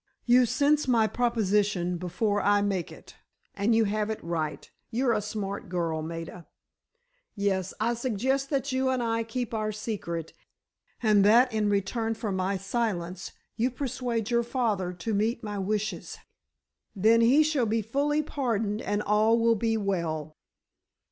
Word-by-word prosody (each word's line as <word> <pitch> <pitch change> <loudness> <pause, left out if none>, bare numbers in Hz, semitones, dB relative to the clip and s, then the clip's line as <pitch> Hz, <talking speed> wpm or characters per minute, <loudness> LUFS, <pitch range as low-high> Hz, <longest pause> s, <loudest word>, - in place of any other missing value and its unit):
"You 245 0 +5
sense 285 +4 +2
my 235 -3 +4
proposition 210 -6 +1
before 200 +4 -1
I 205 0 +3
make 195 -4 -1
it. - - -14 0.4
And 210 +3 +1
you 225 - +4
have 210 0 -1
it 220 - -2
right—you're 170 - -2
a 210 - 0
smart 200 -2 -5
girl, 165 -3 -1
Maida. 165 +1 -7 0.9
Yes, 190 -3 0
I 230 +2 +1
suggest 260 +3 -1
that 275 -1 -1
you 260 0 +1
and 255 -2 0
I 230 0 0
keep 230 +1 -4
our 215 -1 -1
secret, 200 -7 -5 0.7
and 210 -3 +5
that 235 +4 +5
in 215 -1 +1
return 225 +3 0
for 215 -2 -3
my 190 +1 -1
silence 190 -4 -3 0.2
you 240 +3 +2
persuade 250 -4 -3
your 235 0 +3
father 230 -7 -1
to 180 +5 -4
meet 220 +3 0
my 205 -1 -4
wishes. 210 +2 -3 0.8
Then, 220 +4 +4
he 260 +7 +5
shall 295 -6 +1
be 220 +1 0
fully 290 +7 0
pardoned, 225 -7 -1
and 205 0 -1
all 215 +2 +3
will 230 0 +4
be 225 +1 0
well." 165 -7 -2
215 Hz, 150 wpm, -27 LUFS, 195-235 Hz, 0.9 s, You